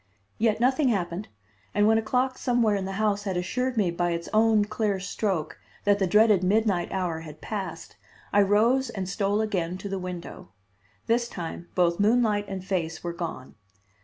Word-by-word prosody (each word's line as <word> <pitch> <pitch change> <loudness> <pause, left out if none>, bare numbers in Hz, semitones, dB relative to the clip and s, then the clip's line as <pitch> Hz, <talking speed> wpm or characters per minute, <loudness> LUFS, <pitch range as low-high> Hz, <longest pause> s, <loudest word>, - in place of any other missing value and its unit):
Yet 220 -1 +2
nothing 260 +4 +3
happened, 185 -2 -2 0.5
and 205 0 +4
when 220 +1 +4
a - - -1
clock 255 +3 0
somewhere 240 -4 +2
in 195 -1 -2
the 195 - -4
house 205 0 0
had 190 -3 -1
assured 250 +7 -2
me 195 -5 +2
by 175 +1 0
its 170 0 -4
own 215 -1 +4
clear 210 -2 -1
stroke 190 -4 -2 0.2
that 205 0 +3
the 190 - +2
dreaded 210 0 +4
midnight 195 -2 +1
hour 180 -4 -2
had 155 -2 -10
passed 190 -6 -6 0.4
I 205 - +6
rose 230 +6 +3
and 195 -5 -4
stole 200 +2 0
again 185 -5 -1
to 200 - -7
the 195 0 -3
window. 180 - -7 0.6
This 235 +1 +1
time 170 0 -6
both 175 -1 +2
moonlight 210 -1 +3
and 190 -2 -6
face 170 -4 -2
were 170 -1 -3
gone. 165 -7 -6
200 Hz, 180 wpm, -26 LUFS, 180-220 Hz, 0.6 s, I